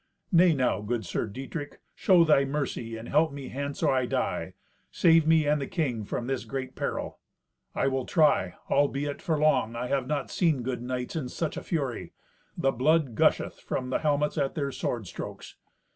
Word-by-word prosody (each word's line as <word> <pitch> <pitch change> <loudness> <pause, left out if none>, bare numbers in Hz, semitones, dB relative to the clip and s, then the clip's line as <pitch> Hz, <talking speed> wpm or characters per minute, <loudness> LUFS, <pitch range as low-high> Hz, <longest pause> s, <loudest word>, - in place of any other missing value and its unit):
"Nay 175 0 +6
now, 125 -5 +1
good 110 +2 -2
Sir - - -2
Dietrich, 135 +7 -7
show 180 -3 +5
thy 150 -4 +4
mercy, 135 -5 -3
and 115 +1 -8
help 155 +2 +3
me 140 -2 -7
hence 140 +1 -4
or - - +4
I 130 -1 +1
die. - - -2 0.3
Save 165 -2 +4
me 160 -1 +5
and 150 0 +2
the 135 - -3
king 125 - -2
from 120 - -3
this 135 0 -2
great 130 -1 -5
peril." - - -3 0.6
"I - - +1
will 135 -1 0
try. 155 -3 +3
Albeit, 145 0 0
for 165 -5 0
long, 150 -6 +2
I 120 +1 -3
have 135 -2 0
not 145 -2 -2
seen 155 -8 +1
good 125 -1 -3
knights 125 +2 -4
in 140 -6 -3
such 160 +3 -3
a - - -4
fury. 140 -8 -3 0.4
The 135 - +2
blood 140 +1 +2
gusheth - - +2
from 125 0 -4
the - - +1
helmets 150 0 +1
at 140 -1 -1
their 140 -3 -1
sword 120 -4 -3
strokes." 85 - -8
140 Hz, 190 wpm, -28 LUFS, 125-150 Hz, 0.6 s, Nay